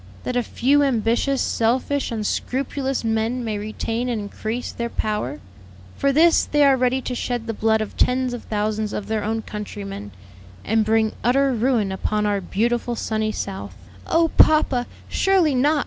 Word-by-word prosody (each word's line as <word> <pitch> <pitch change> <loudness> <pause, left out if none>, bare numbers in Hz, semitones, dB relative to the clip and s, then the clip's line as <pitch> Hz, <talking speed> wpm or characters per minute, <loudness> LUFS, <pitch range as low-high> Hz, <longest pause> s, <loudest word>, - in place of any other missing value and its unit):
That 250 - -3
a 245 - +3
few 275 +5 +2
ambitious, 255 +1 +1
selfish, 255 +5 0
unscrupulous 265 +4 -2
men 225 +2 0
may 215 -3 -2
retain 225 +3 -3
and 235 -3 -1
increase 220 +4 -4
their 235 0 -4
power; 210 - -2 0.6
for 275 - +1
this 325 +4 +5
they 295 0 +2
are 275 -1 +6
ready 255 0 +1
to 255 - -3
shed 245 -1 -3
the 225 - -3
blood 220 +1 +1
of 215 - -5
tens 255 0 +2
of 240 - -7
thousands 215 0 -1
of 205 - -3
their 220 -1 -2
own 220 +1 -2
countrymen, 200 - -6 0.6
and 220 0 +2
bring 220 0 +2
utter 270 +3 +3
ruin 230 -4 +1
upon 210 +2 -1
our 205 -1 0
beautiful, 235 +5 -1
sunny 215 -1 -1
South." 195 -2 -5 0.3
"Oh, 330 0 +3
papa, 275 -5 +4 0.2
surely 375 -6 +2
not!" 290 +4 +3
230 Hz, 165 wpm, -22 LUFS, 215-260 Hz, 0.6 s, are